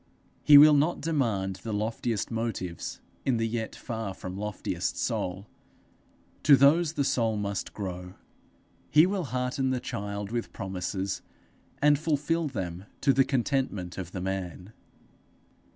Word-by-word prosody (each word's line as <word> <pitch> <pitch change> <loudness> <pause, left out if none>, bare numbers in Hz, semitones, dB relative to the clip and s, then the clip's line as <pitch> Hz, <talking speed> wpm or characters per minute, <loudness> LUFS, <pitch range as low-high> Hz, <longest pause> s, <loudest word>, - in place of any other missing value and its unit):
He 145 -1 +8
will 150 +1 +9
not 150 +4 +2
demand 115 - 0
the 110 +4 -6
loftiest 110 +1 -2
motives 110 -7 -3 0.2
in 130 -3 +1
the 115 0 0
yet 110 -1 -3
far 110 -4 -5
from 95 0 -7
loftiest 105 0 -3
soul: 90 +2 -2 1.0
to 145 - +7
those 150 +4 +4
the 145 - 0
soul 115 -5 +1
must 100 -1 -3
grow. 90 -2 -6 0.7
He 155 +2 +6
will 190 -2 -1
hearten 130 +1 -1
the 130 -1 0
child 100 -2 -5
with 120 -1 -3
promises, 95 -1 -3 0.6
and 145 -1 +5
fulfil 155 +1 0
them 95 -8 -5 0.2
to 135 - +4
the 135 +1 +5
contentment 125 -9 -1
of 90 -2 -6
the 90 - -5
man. 95 +1 -4
115 Hz, 135 wpm, -28 LUFS, 95-140 Hz, 1.0 s, will